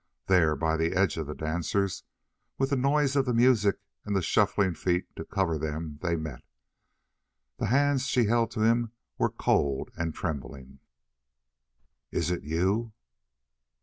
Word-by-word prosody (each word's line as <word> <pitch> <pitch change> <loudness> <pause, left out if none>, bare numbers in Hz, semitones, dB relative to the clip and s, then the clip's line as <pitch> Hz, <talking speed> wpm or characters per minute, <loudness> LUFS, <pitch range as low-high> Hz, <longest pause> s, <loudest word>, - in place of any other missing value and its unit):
There, 85 -5 +4
by 80 0 0
the 80 +1 0
edge 95 -3 +2
of 80 -3 -3
the 75 - -5
dancers, 90 +5 -1 0.5
with 135 +1 0
the - - +3
noise 140 +1 +2
of 135 -1 +3
the 125 - +1
music 115 -5 +4 0.3
and 105 -1 -2
the 95 - +1
shuffling 100 -2 +2
feet 90 +2 0
to - - -6
cover 90 -6 -1
them, 75 0 -4
they 85 -2 0
met. 80 -4 -5 1.2
The - - 0
hands 140 +1 +2
she 125 -3 +2
held 115 +2 +2
to 110 - -3
him 115 +1 +2 0.3
were - - +3
cold 70 -1 0
and 85 -1 -2
trembling. 70 -4 -6 1.3
"Is 85 +1 -1
it 90 - -2
you?" 95 +9 0
95 Hz, 150 wpm, -28 LUFS, 80-115 Hz, 1.3 s, There